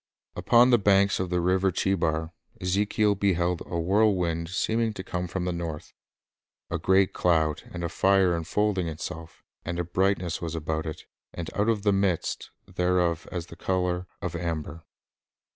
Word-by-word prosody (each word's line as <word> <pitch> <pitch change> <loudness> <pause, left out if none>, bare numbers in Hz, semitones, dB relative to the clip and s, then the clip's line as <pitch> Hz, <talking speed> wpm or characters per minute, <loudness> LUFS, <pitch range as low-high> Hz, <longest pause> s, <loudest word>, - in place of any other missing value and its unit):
Upon 120 +8 +5
the 120 - +5
banks»of 100 -2 +3
the 90 0 +1
river 95 +2 +2
Chcbar, 80 -4 0 0.3
Ezekiel 100 +3 +1
beheld 90 -3 0
a 85 - -3
whirlwind 90 -3 +1
seeming 110 +4 0
to 95 - -7
come 90 -1 -3
from 90 +1 -3
the 90 - 0
north, 85 -3 -5 0.8
"a - - -1
great 95 0 +3
cloud, 80 -3 +1
and 85 -1 -6
a - - 0
fire 95 +1 +3
enfolding 95 +2 0
itself, 80 +1 -7 0.2
and 85 +1 -4
a 90 - 0
brightness 90 0 0
war 85 - -3
about 80 0 -2
it, 80 - -7 0.3
and 85 -2 -5
out 105 +3 +1
of 105 -3 0
the 100 -1 +3
midst 95 -4 -1 0.2
thereof 90 -2 0
as 85 -2 -4
the - - -12
color 90 -1 -1 0.2
of 90 -1 -3
amber." 80 -2 -4
90 Hz, 160 wpm, -27 LUFS, 85-95 Hz, 0.8 s, Upon